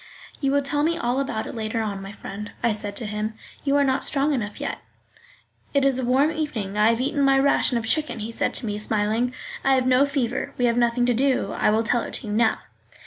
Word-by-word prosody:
"You 275 Hz, -2 st, +1 dB
will 285 Hz, 0 st, +2 dB
tell 290 Hz, +1 st, -1 dB
me 330 Hz, +3 st, +1 dB
all 245 Hz, -3 st, 0 dB
about 245 Hz, -5 st, -2 dB
it -, -, -7 dB
later 225 Hz, 0 st, -3 dB
on, 205 Hz, -3 st, -3 dB
my 195 Hz, 0 st, -7 dB
friend," 205 Hz, 0 st, -8 dB
I 235 Hz, -, +3 dB
said 205 Hz, -1 st, -3 dB
to 230 Hz, -, -3 dB
him; 210 Hz, +1 st, -3 dB, 0.3 s
"you 280 Hz, -1 st, +1 dB
are 285 Hz, -, +4 dB
not 265 Hz, -1 st, +1 dB
strong 285 Hz, +1 st, +2 dB
enough 210 Hz, -6 st, -3 dB
yet." -, -, -3 dB, 1.0 s
"It 280 Hz, -1 st, +4 dB
is 265 Hz, -2 st, +2 dB
a -, -, -2 dB
warm 265 Hz, +5 st, +3 dB
evening, 255 Hz, -11 st, -3 dB
I 210 Hz, +1 st, +4 dB
have 230 Hz, 0 st, +1 dB
eaten 280 Hz, +3 st, 0 dB
my 275 Hz, -1 st, +4 dB
ration 270 Hz, -2 st, +3 dB
of 230 Hz, -, -3 dB
chicken," 305 Hz, +7 st, 0 dB
he 220 Hz, +1 st, -5 dB
said -, -, -1 dB
to -, -, 0 dB
me, 210 Hz, -1 st, -3 dB
smiling; 215 Hz, +3 st, 0 dB, 0.3 s
"I 270 Hz, 0 st, +4 dB
have 255 Hz, -1 st, +1 dB
no 255 Hz, +2 st, +4 dB
fever, 270 Hz, -1 st, -2 dB
we 245 Hz, -, +2 dB
have 235 Hz, -1 st, +2 dB
nothing 240 Hz, 0 st, +2 dB
to 245 Hz, -, +3 dB
do, 255 Hz, -4 st, +1 dB
I -, -, +1 dB
will 220 Hz, +1 st, +2 dB
tell 235 Hz, +1 st, +1 dB
it -, -, -5 dB
to -, -, -5 dB
you 210 Hz, -, -3 dB
now." 220 Hz, 0 st, +2 dB
245 Hz, 250 wpm, -24 LUFS, 215-275 Hz, 1.0 s, are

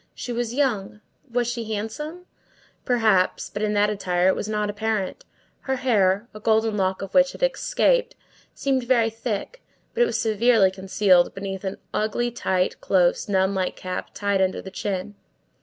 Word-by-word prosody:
She 245 Hz, -, -5 dB
was 235 Hz, -1 st, -2 dB
young. 215 Hz, -8 st, 0 dB, 0.3 s
Was 245 Hz, 0 st, +1 dB
she 235 Hz, -2 st, -4 dB
handsome? 300 Hz, -, -6 dB, 0.6 s
Perhaps; 220 Hz, -7 st, +2 dB
but 205 Hz, -, -4 dB
in 210 Hz, -1 st, 0 dB
that 205 Hz, 0 st, +3 dB
attire 185 Hz, -3 st, +1 dB
it -, -, +2 dB
was 210 Hz, -, -4 dB
not 210 Hz, -1 st, 0 dB
apparent. 210 Hz, -2 st, -2 dB, 0.3 s
Her 265 Hz, -, -2 dB
hair, 215 Hz, -5 st, +2 dB
a 215 Hz, -, -9 dB
golden 220 Hz, 0 st, +2 dB
lock 190 Hz, -1 st, 0 dB
of 195 Hz, -, -8 dB
which 270 Hz, 0 st, +4 dB
had -, -, -7 dB
escaped, -, -, +1 dB, 0.4 s
seemed 270 Hz, -2 st, 0 dB
very 235 Hz, -3 st, +3 dB
thick, 230 Hz, -, -4 dB, 0.3 s
but 480 Hz, 0 st, +3 dB
was -, -, -1 dB
severely 220 Hz, -3 st, +3 dB
concealed 190 Hz, -1 st, +2 dB
beneath 195 Hz, -1 st, -5 dB
an 190 Hz, 0 st, -4 dB, 0.2 s
ugly, 240 Hz, +3 st, 0 dB
tight, 190 Hz, -6 st, -1 dB
close, 180 Hz, +1 st, +2 dB
nun 190 Hz, 0 st, +2 dB
like 190 Hz, -1 st, -1 dB
cap, 185 Hz, 0 st, -5 dB
tied 200 Hz, -1 st, 0 dB
under 190 Hz, 0 st, +1 dB
the 190 Hz, -, -9 dB
chin. 195 Hz, 0 st, -3 dB
210 Hz, 165 wpm, -24 LUFS, 190-240 Hz, 0.6 s, which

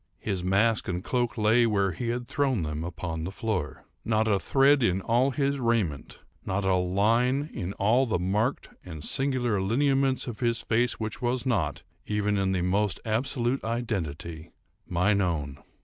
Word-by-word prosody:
His 95 Hz, -4 st, -3 dB
mask 105 Hz, +5 st, +2 dB
and 90 Hz, 0 st, -3 dB
cloak 120 Hz, -2 st, -1 dB
lay, 115 Hz, +2 st, +4 dB
where 100 Hz, -3 st, +1 dB
he 90 Hz, +8 st, -4 dB
had 120 Hz, +1 st, -3 dB
thrown 135 Hz, -, 0 dB
them, 75 Hz, 0 st, -3 dB
upon 80 Hz, -1 st, -4 dB
the 85 Hz, -, -3 dB
floor. 95 Hz, -, -3 dB, 0.2 s
Not 110 Hz, 0 st, +1 dB
a 100 Hz, -3 st, +2 dB
thread 140 Hz, +5 st, +4 dB
in 95 Hz, -5 st, +2 dB
all 120 Hz, +7 st, +2 dB
his 140 Hz, +1 st, 0 dB
raiment—not 100 Hz, -, -2 dB
a 95 Hz, -, +3 dB
line 115 Hz, -, +1 dB
in 95 Hz, -2 st, -4 dB
all 120 Hz, +7 st, +2 dB
the 110 Hz, -, +1 dB
marked 105 Hz, +9 st, -1 dB
and 80 Hz, -4 st, -8 dB
singular 125 Hz, -, 0 dB
lineaments 135 Hz, +5 st, +1 dB
of 120 Hz, -4 st, -6 dB
his 115 Hz, -2 st, 0 dB
face 120 Hz, +1 st, +1 dB
which 110 Hz, +3 st, -5 dB
was 125 Hz, +1 st, 0 dB
not, 100 Hz, -, -1 dB, 0.2 s
even 105 Hz, -1 st, 0 dB
in 95 Hz, -1 st, +1 dB
the 90 Hz, -2 st, 0 dB
most 100 Hz, +2 st, 0 dB
absolute 120 Hz, +3 st, -1 dB
identity, 85 Hz, -9 st, -4 dB, 0.4 s
mine 100 Hz, +4 st, +2 dB
own! 75 Hz, -6 st, -2 dB
110 Hz, 165 wpm, -27 LUFS, 90-120 Hz, 0.4 s, lay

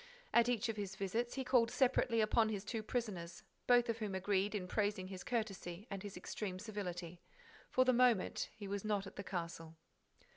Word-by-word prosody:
At 235 Hz, 0 st, +6 dB
each 240 Hz, -3 st, +1 dB
of 225 Hz, -1 st, -3 dB
his 195 Hz, -2 st, -4 dB
visits, 225 Hz, +6 st, -1 dB
he 265 Hz, -, -1 dB
called 245 Hz, -3 st, +4 dB
separately 245 Hz, -3 st, +3 dB
upon 220 Hz, +1 st, +3 dB
his 205 Hz, -2 st, -3 dB
two 225 Hz, 0 st, -2 dB
prisoners, 200 Hz, -7 st, -3 dB, 0.2 s
both 245 Hz, 0 st, +6 dB
of 230 Hz, -1 st, -1 dB
whom 210 Hz, -3 st, -2 dB
agreed 195 Hz, +2 st, +1 dB
in 185 Hz, -3 st, -2 dB
praising 205 Hz, -2 st, 0 dB
his 190 Hz, -2 st, -6 dB
courtesy 200 Hz, -5 st, -3 dB
and 195 Hz, -1 st, -3 dB
his 205 Hz, -2 st, -7 dB
extreme 185 Hz, +1 st, -4 dB
civility. 180 Hz, -4 st, -5 dB, 0.5 s
For 255 Hz, -, +4 dB
the 255 Hz, -, +5 dB
moment, 240 Hz, -5 st, +3 dB
he 210 Hz, -2 st, -8 dB
was 200 Hz, 0 st, -3 dB
not 205 Hz, -2 st, 0 dB
at -, -, -10 dB
the 200 Hz, -, -5 dB
castle. 165 Hz, -3 st, -5 dB
205 Hz, 190 wpm, -37 LUFS, 190-230 Hz, 0.5 s, At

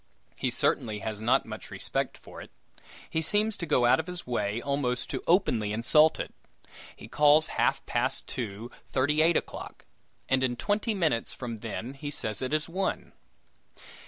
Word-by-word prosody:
He 130 Hz, -, -1 dB
certainly 120 Hz, -2 st, +1 dB
has 110 Hz, -1 st, -4 dB
not 125 Hz, +4 st, +3 dB
much -, -, -8 dB
respect -, -, -1 dB
for -, -, -12 dB
it. -, -, -11 dB, 0.6 s
He 160 Hz, -, -1 dB
seems 210 Hz, +5 st, +3 dB
to 170 Hz, -, -5 dB
go 130 Hz, -5 st, +3 dB
out 120 Hz, -, +5 dB
of 160 Hz, -, -4 dB
his 180 Hz, -1 st, -4 dB
way 105 Hz, -3 st, -1 dB
almost 135 Hz, -2 st, -2 dB
to -, -, -3 dB
openly 125 Hz, -, +2 dB
insult 150 Hz, +8 st, +4 dB
it. -, -, -5 dB, 0.6 s
He -, -, -11 dB
calls 150 Hz, +5 st, +5 dB, 0.2 s
half -, -, +1 dB
past -, -, 0 dB
two 115 Hz, 0 st, -6 dB, 0.2 s
thirty 145 Hz, +4 st, +2 dB
eight 165 Hz, +1 st, +4 dB
o'clock, -, -, -6 dB, 0.4 s
and 130 Hz, 0 st, +2 dB
in 125 Hz, -2 st, +1 dB
twenty 210 Hz, -, -1 dB
minutes 160 Hz, -11 st, 0 dB
from 115 Hz, -3 st, -6 dB
then 115 Hz, +3 st, -5 dB
he 145 Hz, +1 st, -6 dB
says 110 Hz, -6 st, -2 dB
it 130 Hz, -, -2 dB
is 155 Hz, 0 st, 0 dB
one! 190 Hz, +3 st, -3 dB
135 Hz, 170 wpm, -28 LUFS, 115-160 Hz, 0.6 s, out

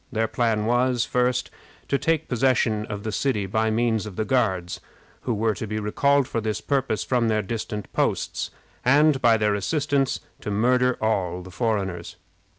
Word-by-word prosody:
Their 110 Hz, -2 st, 0 dB
plan 110 Hz, -2 st, 0 dB
was, 120 Hz, +1 st, +2 dB
first, 125 Hz, 0 st, 0 dB, 0.4 s
to 140 Hz, -, +1 dB
take 160 Hz, -1 st, 0 dB
possession 120 Hz, -4 st, +1 dB
of 105 Hz, -1 st, -5 dB
the 110 Hz, -, -3 dB
city 105 Hz, -4 st, 0 dB
by 110 Hz, +3 st, 0 dB
means 110 Hz, -1 st, 0 dB
of 100 Hz, -, -8 dB
the 110 Hz, -, -1 dB
Guards, 95 Hz, -7 st, 0 dB, 0.4 s
who 125 Hz, -, -1 dB
were 110 Hz, +1 st, +1 dB
to 110 Hz, -, -5 dB
be 105 Hz, +1 st, -3 dB
recalled 140 Hz, +6 st, +2 dB
for 115 Hz, -, -2 dB
this 110 Hz, -1 st, -2 dB
purpose 135 Hz, -5 st, -1 dB
from 120 Hz, -3 st, +1 dB
their 110 Hz, -1 st, +1 dB
distant 105 Hz, 0 st, -5 dB
posts, -, -, -1 dB, 0.3 s
and 145 Hz, +2 st, +4 dB
by 115 Hz, -2 st, +5 dB
their 105 Hz, -1 st, +1 dB
assistance 140 Hz, -, 0 dB, 0.2 s
to -, -, -5 dB
murder 125 Hz, +4 st, +2 dB
all 90 Hz, -5 st, 0 dB
the 95 Hz, -, -11 dB
foreigners. 95 Hz, -6 st, -2 dB
110 Hz, 170 wpm, -24 LUFS, 105-125 Hz, 0.4 s, by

